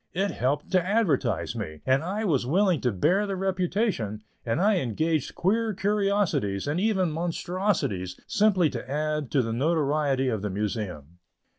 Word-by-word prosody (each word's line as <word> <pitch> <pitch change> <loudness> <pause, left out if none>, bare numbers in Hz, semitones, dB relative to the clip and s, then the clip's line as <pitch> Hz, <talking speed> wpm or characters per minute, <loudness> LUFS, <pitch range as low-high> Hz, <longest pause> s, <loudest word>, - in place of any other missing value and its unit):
It 195 +2 +1
helped 140 +4 -1
to 185 -2 +3
advertise 195 - 0
me, 80 -1 -6
and 130 +2 +2
I 205 +6 -2
was 145 -10 +2
willing 180 +4 +2
to 125 - +1
bear 180 - +2
the 195 - -2
reputation 185 - -1 0.2
and 115 +6 -1
I 205 +2 +3
engaged 155 - -1
queer 220 +3 +1
curiosities, 195 - 0
and 150 +4 0
even 190 -4 +1
monstrosities, 165 - -2
simply 190 -7 +3
to 130 - -6
add 150 -1 -1
to 135 -4 +2
the 115 0 -2
notoriety 145 -1 +1
of 110 -4 -2
the 105 - -2
Museum. 95 -6 -4
155 Hz, 155 wpm, -26 LUFS, 125-195 Hz, 0.2 s, to